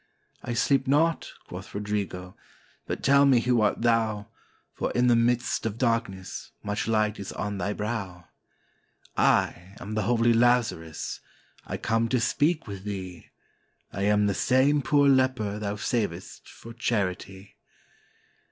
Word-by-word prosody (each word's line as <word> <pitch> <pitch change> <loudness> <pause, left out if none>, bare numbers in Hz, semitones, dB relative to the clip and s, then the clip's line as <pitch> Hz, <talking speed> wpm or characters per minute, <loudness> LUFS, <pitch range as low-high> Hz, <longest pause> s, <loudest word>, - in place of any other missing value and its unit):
"I 120 - -3
sleep 135 +3 +2
not," 160 +4 +2 0.2
quoth - - -9
Rodrigo; 100 -3 -4 0.5
"but - - -4
tell 140 +1 +5
me 130 -3 +5
who 120 -1 +2
art 110 +2 +1
thou, 110 -3 +1 0.4
For, - - -2
in 125 - +2
the 120 -1 +5
midst 120 +1 +1
of 110 0 -5
darkness, 115 -6 -2
much 105 0 -2
light 110 -1 +1
is 100 - -6
on 100 -1 -4
thy 100 +3 -1
brow?" 95 -5 -4 0.9
"I 90 +3 +1
am 105 - -7
the 110 - 0
holy 115 +2 +3
Lazarus, 115 -9 +1 0.5
I - - -3
come 115 +1 0
to 125 - +2
speak 155 +7 +1
with 100 -3 -8
thee; 95 -4 -6 0.7
I 100 - -4
am 105 0 +3
the 100 - +1
same 135 +7 +3
poor 145 +1 +3
leper 130 -6 +2
thou 105 -1 -3
savedst 100 -5 -3
for 115 - -12
charity. 100 -4 -3
110 Hz, 145 wpm, -26 LUFS, 100-120 Hz, 0.9 s, tell